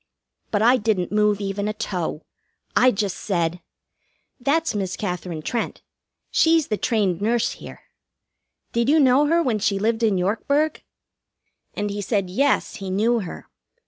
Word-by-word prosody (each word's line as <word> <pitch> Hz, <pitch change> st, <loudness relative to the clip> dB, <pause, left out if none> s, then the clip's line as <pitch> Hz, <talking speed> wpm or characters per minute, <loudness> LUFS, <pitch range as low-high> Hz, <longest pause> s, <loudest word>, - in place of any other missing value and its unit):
But 210 Hz, 0 st, +1 dB
I 245 Hz, +3 st, +6 dB
didn't 205 Hz, -6 st, 0 dB
move 210 Hz, -1 st, +2 dB
even 200 Hz, 0 st, -2 dB
a 215 Hz, -, -1 dB
toe. 180 Hz, -7 st, -3 dB, 0.5 s
I 255 Hz, -, +6 dB
just 200 Hz, -4 st, -1 dB
said: 175 Hz, -3 st, -1 dB, 0.8 s
"That's 300 Hz, +5 st, +1 dB
Miss 190 Hz, -3 st, -3 dB
Katherine 180 Hz, -5 st, -4 dB
Trent. 235 Hz, +5 st, -3 dB, 0.5 s
She's 325 Hz, -1 st, +3 dB
the 215 Hz, -, +1 dB
trained 200 Hz, -7 st, 0 dB
nurse 230 Hz, +2 st, +1 dB
here. -, -, -10 dB, 0.9 s
Did 235 Hz, +2 st, +1 dB
you 315 Hz, +2 st, +5 dB
know 275 Hz, +1 st, +5 dB
her 335 Hz, +2 st, +3 dB
when 235 Hz, -7 st, 0 dB
she 200 Hz, -1 st, +1 dB
lived 225 Hz, +3 st, 0 dB
in 215 Hz, -4 st, +2 dB
Yorkburg?" 280 Hz, +11 st, 0 dB, 0.9 s
And 205 Hz, 0 st, -2 dB
he 205 Hz, 0 st, -4 dB
said 195 Hz, -2 st, -1 dB
yes, 275 Hz, +7 st, +1 dB
he 195 Hz, -2 st, -6 dB
knew 225 Hz, +5 st, +2 dB
her. 185 Hz, -6 st, -7 dB
210 Hz, 150 wpm, -23 LUFS, 195-245 Hz, 0.9 s, I